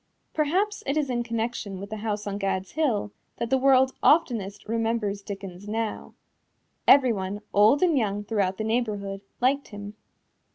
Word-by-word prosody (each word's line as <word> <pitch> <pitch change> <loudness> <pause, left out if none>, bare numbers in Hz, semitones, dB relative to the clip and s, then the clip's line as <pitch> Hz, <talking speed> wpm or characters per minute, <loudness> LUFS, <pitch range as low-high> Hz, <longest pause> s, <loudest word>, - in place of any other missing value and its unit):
Perhaps 370 +8 0
it 275 +3 0
is 285 -4 0
in 240 -1 0
connection 230 -4 -3
with 200 +2 -8
this 220 - -4
house 210 -1 -3
on 200 0 -3
Gad's 190 -1 -2
Hill 245 -10 0 0.3
that 235 - -3
the 265 - +5
world 265 0 +4
oftenest 225 - +2
remembers 225 -2 -1
Dickens 195 -1 -8
now. 220 +1 -3 0.7
Everyone, 205 -7 +4
old 215 - +5
and 340 -4 +4
young 205 -5 0
throughout 200 -3 0
the 220 - -2
neighborhood, 210 -4 -2 0.2
liked 275 +3 +2
him. 205 -1 -8
220 Hz, 155 wpm, -26 LUFS, 200-255 Hz, 0.7 s, the